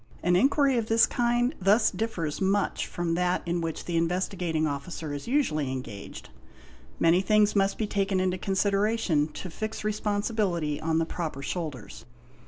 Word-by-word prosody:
An 175 +1 +3
inquiry 270 +4 +3
of 220 - -3
this 225 0 +5
kind 240 +2 +1
thus 210 +4 +4
differs 185 -7 -3
much 195 +1 +1
from 175 -1 -2
that 180 +1 0
in 170 0 -1
which 165 -1 -4
the 170 -1 -1
Investigating 170 -1 0
Officer 145 +1 -4
is 145 - -6
usually 160 - +1
engaged; 125 -6 -7 0.7
many 165 +2 +4
things 210 +1 +3
must 195 0 +2
be 220 - 0
taken 195 -2 0
into 185 0 0
consideration 195 -4 +1
to 165 +4 -8
fix 215 +6 -5
responsibility 205 -7 -1
on 160 0 0
the 165 - +2
proper 160 -5 -5
shoulders. 150 - -5
185 Hz, 155 wpm, -27 LUFS, 160-210 Hz, 0.7 s, this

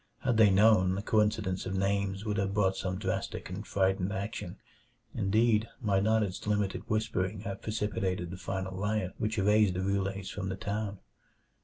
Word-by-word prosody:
Had 125 -4 +1
they 110 -2 +7
known, 95 -2 +5
the 100 - -3
coincidence 105 -4 +1
of 95 - -2
names 100 +1 0
would 105 -1 -1
have 100 0 -1
brought 95 -2 +2
some 95 -1 -3
drastic - - -3
and - - -6
frightened 95 0 +1
action 100 +2 -4 0.6
indeed, 110 +2 +2
might 100 -4 +1
not 110 +1 +3
its 100 0 -5
limited 105 -2 0
whispering 105 -2 -1
have 100 -2 -5
precipitated 100 -5 -2
the 90 - -6
final 95 0 -4
riot 105 -1 -1
which 110 +1 -1
erased 105 -1 +4
the 90 - -1
Roulets 100 0 -1
from 95 -2 -4
the 95 - -2
town? 100 +1 -3
100 Hz, 170 wpm, -30 LUFS, 95-105 Hz, 0.6 s, they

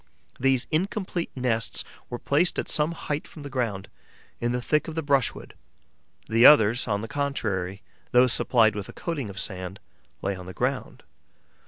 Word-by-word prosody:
These 135 0 +3
incomplete 180 +1 -1
nests 120 -3 0 0.3
were 120 - -4
placed 150 +8 +1
at - - -2
some 155 +2 +2
height 150 -2 -4
from 150 - -11
the 140 - -7
ground, 115 -7 -2 0.5
in 120 0 0
the 125 - 0
thick 150 +5 +1
of 160 - -6
the 160 - -2
brushwood; 140 -3 0 0.7
the 115 +2 +3
others, 120 -4 +7
on 100 -2 0
the 115 - -5
contrary, 100 -9 -2 0.3
those 125 0 +5
supplied 115 -4 +3
with 105 -2 -6
a - - -9
coating 145 -10 -4
of 100 0 -7
sand, 95 0 -5 0.4
lay 100 0 0
on 90 -1 -9
the 95 - -8
ground. - - -2
125 Hz, 170 wpm, -26 LUFS, 105-145 Hz, 0.7 s, others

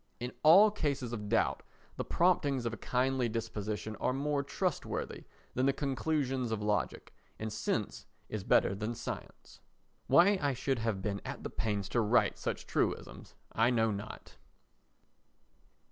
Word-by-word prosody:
In 125 +1 -4
all 190 +8 +8
cases 140 - -2
of 105 -3 -5
doubt, 115 0 +2 0.3
the - - -2
promptings 145 -8 +2
of 115 - -1
a - - -5
kindly 125 +1 0
disposition 110 -1 -4
are - - 0
more 140 +1 0
trustworthy 140 - -3 0.3
than 130 +2 +1
the 140 - +3
conclusions 135 -2 -1
of 110 - -1
logic, 105 -1 -1 0.2
and 110 0 -4
sense 110 -1 -2 0.2
is 110 -3 -4
better 100 - +3
than 105 +4 -3
science. - - -8 0.5
Why 190 +3 +6
I 140 -2 +1
should 130 0 -1
have 110 -4 -2
been 100 -1 -2
at - - -6
the - - -5
pains 105 -4 -2
to 120 - +2
write 115 +3 +2
such - - -3
truisms - - -2 0.2
I 115 +2 +3
know 115 -3 +2
not. 105 +1 -7
120 Hz, 150 wpm, -32 LUFS, 110-140 Hz, 0.5 s, all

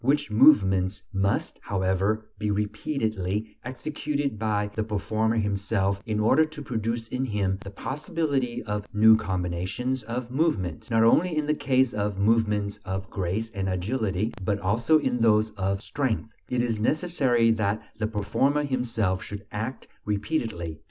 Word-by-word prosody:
which 145 0 +1
movements 95 -6 +4
must, 95 +1 0
however, 95 +3 0
be 105 -1 -1
repeatedly 105 -1 -2
executed 140 -1 -3
by 105 -2 0
the 110 +1 -1
performer 110 +1 0
himself 100 -1 0
in 105 -1 0
order 130 +8 +5
to 155 -1 -6
produce 115 -3 -3
in 130 +1 -2
him 100 -6 0
the 100 - -7
possibility 140 - -2
of 105 -1 -3
new 110 +1 +8
combinations 95 +6 -2
of 120 +2 -5
movement. 125 - -1
Not 115 -1 +4
only 160 +8 +4
in 150 - +1
the 150 - +2
case 130 -3 +2
of 105 -1 -1
movements 105 -1 +1
of 95 0 -4
grace 100 +4 -2
and 95 -3 -2
agility, 100 +2 -1
but 100 +2 +1
also 115 +11 +3
in 125 -5 0
those 110 -1 +3
of 95 0 -2
strength, 125 -6 -2 0.2
it 125 -1 +1
is 115 -3 -1
necessary 130 -4 +2
that 110 -1 +1 0.2
the 110 - 0
performer 135 +7 +1
himself 115 -8 0
should 105 0 -7
act 110 +5 -4 0.2
repeatedly. 105 - -2
110 Hz, 145 wpm, -26 LUFS, 100-125 Hz, 0.2 s, new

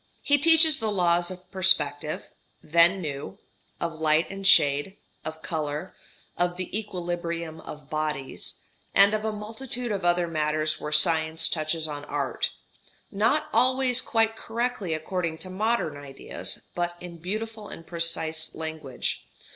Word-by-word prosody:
He 285 0 +3
teaches 320 -1 +7
the 220 -2 -1
laws 175 -2 +2
of 185 0 -10
perspective 155 -6 +5 0.4
(then 170 +4 +4
new), 140 - -6 0.4
of 170 -1 -2
light 155 +1 +2
and 195 0 -3
shade, 145 +2 +4 0.3
of 160 0 -7
colour, 155 0 -4 0.5
of 175 0 0
the 185 +1 -4
equilibrium 170 -5 -4
of 150 -2 -10
bodies, 155 -3 -3 0.4
and 200 +1 +6
of 215 0 -1
a 220 - -1
multitude 230 +3 -4
of 195 -2 -3
other 175 0 +2
matters 155 -1 -1
where 150 - -5
science 160 0 +4
touches 155 +1 -1
on 145 -1 -6
art 140 -4 -1 0.6
not 230 +10 +1
always 255 +1 +3
quite 225 -2 +1
correctly 225 -6 -3
according 165 0 -3
to 185 +3 -7
modern 215 -5 -1
ideas, 140 -1 -5
but 175 0 -3
in 175 -1 -9
beautiful 215 +4 -5
and 165 - -10
precise 160 -2 -1
language. 160 -5 -4
175 Hz, 140 wpm, -26 LUFS, 155-210 Hz, 0.6 s, teaches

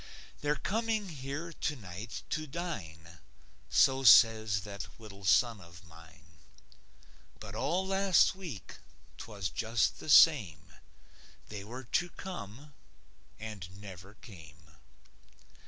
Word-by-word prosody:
They're 145 0 +1
coming 220 +2 -2
here 145 +3 -6
tonight 110 - -5
to 155 -1 -2
dine, 85 - -7 0.5
So 135 -1 +4
says 110 -2 +6
that 100 0 -7
little 100 -3 -12
son 115 +2 +3
of 85 0 -14
mine. 80 0 -18 1.0
But 100 -2 -9
all 170 - -1
last 195 -1 +3
week, 170 - -9 0.4
'twas 100 -5 -5
just 115 +5 0
the - - -8
same; 85 - +5 0.8
They 105 -2 -7
were 125 +5 -8
to 175 +8 -1
come, 145 - -9 0.7
and 100 -4 -8
never 100 0 -11
came. 80 -8 -15
110 Hz, 105 wpm, -31 LUFS, 90-150 Hz, 1.0 s, says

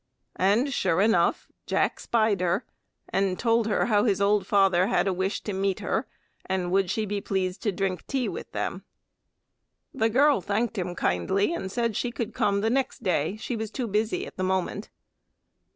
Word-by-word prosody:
And 220 +9 +2
sure 165 -7 +1
enough 195 -5 +2 0.2
Jack - - +1
spied 220 -5 +1
her 180 +6 0 0.4
and 195 -2 0
told 230 -1 +2
her 215 - +1
how 210 -3 +3
his 205 -5 +2
old 200 -1 +2
father 195 -2 +4
had - - +1
a 190 - +1
wish 190 +3 -2
to 210 - -4
meet 195 0 0
her, - - -1 0.4
and 185 -2 -1
would 190 -1 +2
she 215 +3 -1
be 205 0 -3
pleased 190 -1 -2
to 210 - 0
drink 190 -2 -3
tea 265 -3 -1
with - - -6
them. - - -3 1.1
The 225 -4 +1
girl 275 +1 +4
thanked 220 +6 -1
him 180 -3 -3
kindly, 190 - +1
and 190 - -4
said 230 -1 -1
she 245 - -1
could 235 -2 -4
come 200 0 +1
the 220 - +1
next 265 +1 -1
day; 175 0 0
she 240 +2 -4
was 220 -1 -4
too 250 +3 -3
busy 215 +1 -1
at - - -12
the 185 - -2
moment. 190 +2 -1
200 Hz, 185 wpm, -26 LUFS, 190-225 Hz, 1.1 s, father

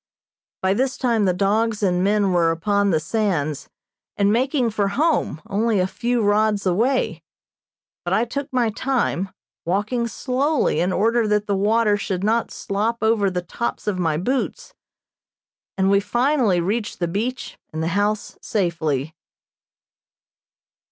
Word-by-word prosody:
By 190 0 +3
this 255 +5 0
time 230 -5 +1
the 185 - +3
dogs 210 +4 0
and 180 -2 +2
men 200 -1 +2
were 170 -2 +3
upon 200 +5 +1
the 160 -4 +2
sands, 160 -5 -1 0.5
and 200 0 +3
making 255 0 +1
for 205 -1 0
home, 255 - 0
only 215 +1 +1
a 180 - +2
few 240 +4 -1
rods 210 0 +2
away, 230 +9 +1 0.8
but - - -3
I 230 - +2
took 280 +4 -5
my 245 -3 +1
time, 220 -6 -1 0.3
walking 210 +7 -1
slowly 260 - 0
in 180 +3 +1
order 225 +4 +2
that 210 0 +1
the 200 - 0
water 210 +1 +2
should 190 -2 -3
not 225 +3 +1
slop 220 +4 -2
over 220 -3 +3
the 180 -1 -3
tops 235 +7 -4
of 200 -3 -1
my 160 -3 +1
boots, 255 - -2 1.0
and 190 0 +2
we 200 - +5
finally 240 -3 +1
reached 210 +5 -2
the 175 - -1
beach 225 +9 -4
and 160 0 -3
the 165 - 0
house 205 +3 -1
safely. 160 - -1
210 Hz, 145 wpm, -22 LUFS, 185-235 Hz, 1.0 s, we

